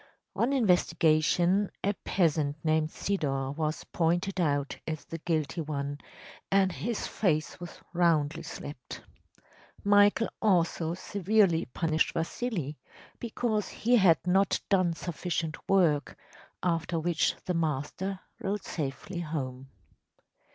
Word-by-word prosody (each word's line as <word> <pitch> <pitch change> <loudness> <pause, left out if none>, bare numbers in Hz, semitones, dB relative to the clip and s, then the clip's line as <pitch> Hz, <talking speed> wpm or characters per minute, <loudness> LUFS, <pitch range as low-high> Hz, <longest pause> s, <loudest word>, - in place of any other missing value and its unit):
‚ÄĚ - - -2
On 240 +4 +3
investigation, 180 - +3
a 200 - +2
peasant 155 -7 0
named 155 0 +2
Sidor 135 -9 -1
was 155 0 -2
pointed 175 +3 0
out 145 -3 0
as 155 -2 -4
the 165 - -6
guilty 155 -1 -1
one, 145 -2 -3 0.5
and 195 -1 +3
his 220 +5 -3
face 155 -6 0
was 175 -1 -9
roundly 165 -4 +2
slapped. 140 -4 -8 0.8
Michael 205 +2 +5
also 170 -4 +2
severely 195 -2 +2
punished 160 +4 0
Vasili, 165 - -3 0.4
because 225 -2 -1
he 245 +3 +2
had 180 -6 +6
not 190 +2 +3
done 185 -4 +3
sufficient 165 -1 -3
work, 165 -7 +3 0.5
after 165 -1 0
which 165 0 +1
the 180 - 0
master 165 +4 -2 0.2
rode 200 +1 -2
safely 160 +4 -4
home. 135 -5 -4
170 Hz, 115 wpm, -29 LUFS, 155-195 Hz, 0.8 s, had